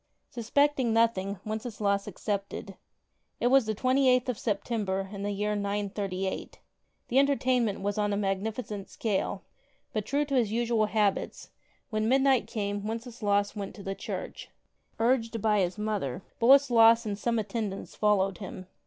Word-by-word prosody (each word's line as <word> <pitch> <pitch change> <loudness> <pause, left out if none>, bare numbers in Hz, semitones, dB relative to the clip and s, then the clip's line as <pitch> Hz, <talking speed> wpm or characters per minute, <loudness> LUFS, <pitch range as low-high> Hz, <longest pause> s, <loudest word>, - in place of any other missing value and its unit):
Suspecting 255 +1 +1
nothing, 205 -4 +2
Wenceslaus 215 -2 -1
34 - - -5
accepted. 200 0 -4 0.6
It 240 - +2
was 270 -4 +5
the 215 - -1
28th 255 +1 +3
of 240 - -2
September 200 -3 -1
in 200 - -6
the 205 - -2
year 210 +1 -1
938. 200 -2 -3 0.5
The 255 - +4
entertainment 255 -7 +2
was 205 +1 -1
on 205 0 +1
a 200 - 0
magnificent 205 +1 -3
scale, 210 -4 -2 0.5
but, 215 -1 -2
true 285 +2 +1
to 280 - -5
his 235 -6 +2
usual 230 -1 +1
habits, 210 -2 -1 0.4
when 215 0 0
midnight 265 -1 +3
came 205 -1 -3
Wenceslaus 220 -3 -1
went 200 -2 -5
to 200 - -10
the 195 - -3
church. - - -6 0.5
Urged 230 -1 +1
by 210 0 +2
his 180 0 0
mother, 205 -7 -2 0.2
Boleslas 235 -3 +6
and 205 -2 -2
some 235 +3 -1
at 215 -2 -2
tendants 205 -3 -4
followed 195 -3 +1
him. 185 -1 -7
215 Hz, 150 wpm, -28 LUFS, 200-235 Hz, 0.6 s, Boleslas